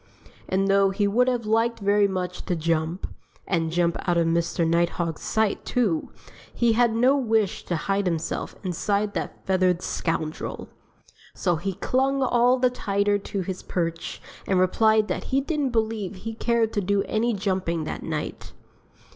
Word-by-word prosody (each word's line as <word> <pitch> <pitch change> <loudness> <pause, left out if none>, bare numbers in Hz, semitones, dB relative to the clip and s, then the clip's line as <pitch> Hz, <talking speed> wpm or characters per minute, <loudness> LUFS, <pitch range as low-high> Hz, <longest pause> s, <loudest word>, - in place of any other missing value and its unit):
And 195 +1 +1
though 195 0 +4
he 200 +1 +1
would 245 +5 +3
have 245 -3 0
liked 225 +2 +2
very 205 0 +3
much 180 -2 -4
to 180 - 0
jump 165 +2 -1 0.4
and 165 -3 0
jump 170 0 +1
out 175 - +3
of 170 - +3
Mr. 170 0 +1
Nighthawk's 170 -1 0
sight, 220 -2 0
too 210 -11 0 0.4
he 235 -1 +2
had 235 0 +3
no 255 +4 +4
wish 225 -7 +1
to 175 - -1
hide 195 +4 0
himself 165 -2 -2
inside 205 +3 -1
that - - -5
feathered 185 -2 +2
scoundrel. 160 -2 -3 0.7
So 175 -3 +1
he 195 +4 -3
clung 270 +5 +1
all 245 0 +3
the 250 0 +2
tighter 205 -3 0
to 200 0 -4
his 185 0 -5
perch 165 -2 -3 0.3
and 190 -2 +2
replied 215 +3 +3
that - - -3
he 270 - +1
didn't 290 -1 -1
believe 220 -4 -1
he 225 +4 -6
cared 230 0 +1
to 205 - 0
do 200 +1 +1
any 230 +2 0
jumping 185 -4 -1
that - - -5
night. - - -5
200 Hz, 165 wpm, -25 LUFS, 175-225 Hz, 0.7 s, though